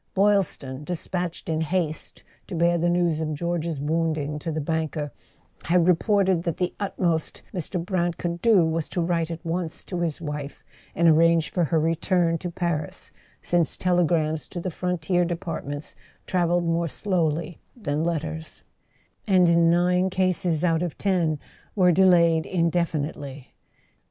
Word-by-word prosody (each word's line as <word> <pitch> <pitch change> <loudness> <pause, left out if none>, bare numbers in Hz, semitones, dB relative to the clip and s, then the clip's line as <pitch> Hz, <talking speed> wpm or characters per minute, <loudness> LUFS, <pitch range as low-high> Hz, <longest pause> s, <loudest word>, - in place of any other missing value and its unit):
Boylston, 190 -9 +1
despatched 175 +1 -4
in 160 -1 0
haste 160 -1 -2 0.2
to 185 - -5
bear 170 +1 +2
the 175 +1 +2
news 175 -2 +1
of 155 -1 -2
George's 170 -1 -2
wounding 155 -1 -1
to 165 - -4
the 155 - -2
banker, 155 -1 -2 0.5
had 175 0 +3
reported 185 0 +3
that 170 -2 -3
the 180 -1 -1
utmost 175 -5 -1
Mr. 180 +1 -3
Brant 175 -2 0
could 170 -1 -3
do 210 -7 +5
was 160 -1 -1
to - - -3
write 165 -1 0
at 165 +1 -7
once 165 -1 -3
to 180 - -4
his 165 -4 -1
wife, 150 -3 -6 0.3
and 170 +1 +3
arrange 165 0 +4
for 175 -2 +1
her 160 +1 +1
re¬ 165 +1 0
turn 170 -3 +2
to 180 - -4
Paris, 170 -3 -3 0.3
since 175 -3 +1
telegrams 170 -3 +1
to 175 - -6
the 180 +1 -3
frontier 180 +1 0
depart¬ 170 -2 -4
ments 145 +1 -4 0.3
travelled 175 -1 +1
more 165 0 +1
slowly 170 -2 -1 0.2
than 150 -8 -1
letters, 160 -1 -3 0.6
and 185 -3 +5
in 170 0 +4
nine 180 +2 +3
cases 185 -3 0
out 165 -2 +2
of 175 -3 -3
ten 175 -6 +1 0.4
were 180 -3 +5
delayed 170 -3 +4
indefinitely. 155 -6 -2
170 Hz, 150 wpm, -25 LUFS, 160-180 Hz, 0.6 s, do